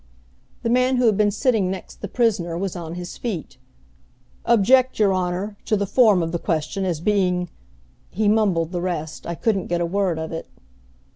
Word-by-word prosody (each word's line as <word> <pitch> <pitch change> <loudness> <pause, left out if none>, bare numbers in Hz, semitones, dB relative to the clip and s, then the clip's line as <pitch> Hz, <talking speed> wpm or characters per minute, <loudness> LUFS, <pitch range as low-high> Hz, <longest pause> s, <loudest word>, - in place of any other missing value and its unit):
The 230 - 0
man 255 +1 +3
who 250 0 +2
had 220 -3 +4
been 210 0 +3
sitting 215 -3 +1
next 190 -1 -7
the 205 - -4
prisoner 195 -7 0
was 190 0 -3
on 170 -1 -6
his 180 0 -7
feet. 190 - -5 0.9
"Object, 250 +3 +4
your 205 -3 +3
Honor, 185 +3 -2
to 215 - +1
the 200 - 0
form 205 -3 +4
of 165 - -3
the 170 - -2
question, 165 +4 -2
as 175 -4 -1
being 180 -2 +1 0.3
" - - -33 0.2
He 210 +3 -1
mumbled 195 -6 +2
the 175 -2 -2
rest, 170 -4 -4
I 170 - -3
couldn't 200 0 0
get 175 0 -1
a 175 - +1
word 185 -1 0
of 160 0 -5
it. 165 - -5
190 Hz, 195 wpm, -22 LUFS, 175-215 Hz, 0.9 s, had